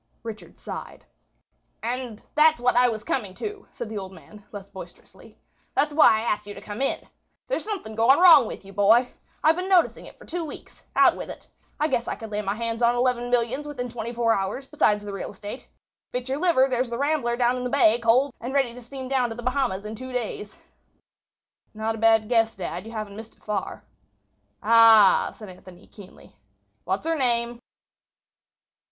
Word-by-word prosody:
Richard 225 -2 -9
sighed. - - -8 0.8
"And 240 -2 -4
that's 310 -1 +4
what 250 0 +2
I 245 0 +5
was 220 -2 -5
coming 205 -7 -3
to," 420 -1 -7
said 240 - -7
the 215 -1 -5
old 190 -1 -8
man, 205 +3 -15
less 200 -2 -9
boisterously. 190 -2 -13 0.4
"That's 295 +1 +1
why 305 +1 +7
I - - -2
asked 210 -2 -2
you 205 - -8
to - - -9
come 210 +4 -7
in. 275 - -1 0.4
There's - - -2
something 390 - -5
going 230 +5 +4
wrong 325 -9 +8
with - - -8
you, 195 - -12
boy. 220 +5 +4 0.3
I've 315 +1 +5
been 365 +2 -4
noticing 365 -3 +2
it - - -15
for - - -15
two 345 +1 -4
weeks. 300 - -10
Out - - +5
with - - -7
it. - - -10 0.3
I 305 - +2
guess 250 -5 -1
I - - -2
could 225 -1 -9
lay 210 0 -2
my 200 0 -2
hands 230 +1 -3
on 240 0 +4
eleven 245 -1 0
millions 245 +4 0
within 250 -4 -5
twenty 235 0 -5
four 235 -1 +1
hours, 200 +7 -3
besides 215 -8 +1
the 205 -1 -6
real 195 - -5
estate. 205 +5 -9 0.5
If 250 - -1
it's 250 - -12
your 275 - -1
liver, 325 -7 +3
there's 255 -1 -1
the 235 - -4
Rambler 280 -4 0
down 245 0 +2
in 250 - -4
the 250 - -2
bay, 240 -4 +4
coaled, 245 +3 +3
and 250 +4 -5
ready 265 -4 +1
to 250 - -11
steam 260 +2 -8
down 255 -2 +1
to 225 - -6
the 240 - -8
Bahamas 250 -6 -1
in 215 - -5
two 255 +4 -8
days." 220 -4 -5 1.2
"Not 220 +1 -2
a 225 - -7
bad 225 -1 +4
guess, 225 -1 +2
dad; 190 +3 -6
you - - -9
haven't 215 -3 -6
missed 225 0 -10
it - - -31
far." 210 -2 -4 0.8
"Ah," 225 -3 +6
said 215 - -11
Anthony, 180 0 -14
keenly; 200 -3 -16 0.5
"what's 190 +9 -2
her 330 0 +1
name?" 240 -3 0
235 Hz, 205 wpm, -25 LUFS, 215-260 Hz, 1.2 s, wrong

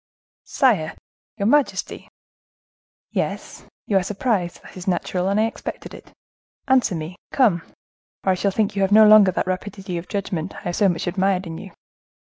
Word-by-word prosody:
"Sire, 200 - +1 0.4
your 200 - -2
majesty—" 285 +5 +1 1.0
"Yes, - - -4 0.2
you 195 -2 +2
are - - -3
surprised; 195 -3 -2
that - - -14
is 185 0 -9
natural, 185 0 -1
and 200 +2 +1
I 220 - +3
expected 225 - -6
it. - - -13 0.6
Answer 260 -8 +3
me, 160 +2 -6
come! 210 -11 +3 0.6
or 190 - +2
I - - +4
shall 190 +2 0
think 200 0 -1
you 200 - 0
have 195 0 +1
no 215 +1 +8
longer 210 -2 +8
that 185 - -1
rapidity 185 -1 -4
of 170 - -10
judgment 190 -4 -4
I - - -8
have 175 0 -3
so 200 - +3
much 170 -2 -2
admired 190 +1 0
in 165 -1 -7
you." 195 -2 -10
195 Hz, 175 wpm, -22 LUFS, 180-210 Hz, 1.0 s, no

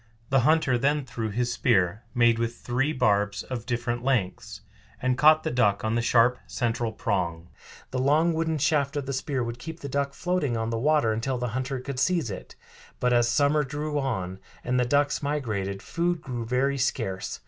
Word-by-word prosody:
The 135 - +5
hunter 130 -2 +3
then 145 +2 +1
threw 115 -3 -4
his 120 +3 -1
spear, 105 -5 +2
made 120 -1 +4
with 115 0 -1
three 130 +5 -1
barbs 105 -6 +1
of 125 -3 -6
different 120 -1 -2
lengths, 120 -9 -1 0.4
and 130 0 +1
caught 155 +3 +5
the - - -1
duck 105 -5 +2
on 110 - 0
the 120 - +1
sharp 120 +1 +3
central 120 -2 -1
prong. 90 -8 -2 0.4
The 130 - -2
long 155 +6 +3
wooden 160 0 0
shaft 145 -1 +1
of 140 - -2
the 135 - -3
spear 130 0 -2
would 115 +1 -5
keep 160 +5 -8
the 140 - -5
duck 140 0 -2
floating 165 -10 -1
on 115 0 -2
the 115 - -1
water 145 -4 +3
until 125 +4 -2
the 125 0 -2
hunter 130 +3 -3
could 130 0 -5
seize 170 - +1
it. 95 - -8 0.4
But 125 0 +2
as 120 0 +3
summer 145 +4 +3
drew 150 +2 -3
on, 95 -9 -3 0.2
and 125 +1 0
the 125 - +2
ducks 145 +3 +1
migrated, 110 -10 -2
food 175 0 -1
grew 120 -3 -5
very 135 +3 +1
scarce. 105 -7 -2
125 Hz, 190 wpm, -26 LUFS, 115-140 Hz, 0.4 s, The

